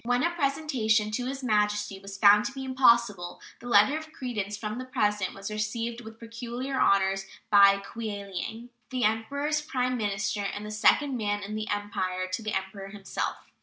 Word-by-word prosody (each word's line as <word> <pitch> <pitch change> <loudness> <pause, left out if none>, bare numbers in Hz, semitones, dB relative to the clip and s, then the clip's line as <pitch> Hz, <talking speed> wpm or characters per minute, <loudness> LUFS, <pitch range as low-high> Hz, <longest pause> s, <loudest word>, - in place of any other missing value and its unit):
When 245 +2 +1
a 340 - +2
presentation 275 -9 +1
to 245 +3 -2
His 270 0 -5
Majesty 210 -3 +1
was 195 0 -9
found 205 +1 +6
to - - -2
be 265 0 -6
impossible, 235 -8 +3 0.2
the 245 - -10
letter 235 +5 +5
of 315 0 -6
credence 210 -8 -4
from 215 +3 -4
the 255 - -5
President 210 -6 0
was 195 +1 -6
received 230 +2 -3
with 220 -1 -11
peculiar 240 +3 -5
honors 195 0 +3 0.2
by 200 -1 +7
Kweiliang, 210 +2 -6 0.2
"the 255 -1 -2
Emperor's 280 +8 0
prime 255 -4 -1
minister 210 -1 -1
and 205 +1 -4
the 210 - -6
second 260 +5 +3
man 205 -2 -1
in 205 +2 -6
the 215 0 -4
Empire 185 -3 -2
to 185 - -2
the 215 -1 -3
Emperor 190 +1 -4
himself." 195 -1 -5
215 Hz, 175 wpm, -28 LUFS, 205-250 Hz, 0.2 s, by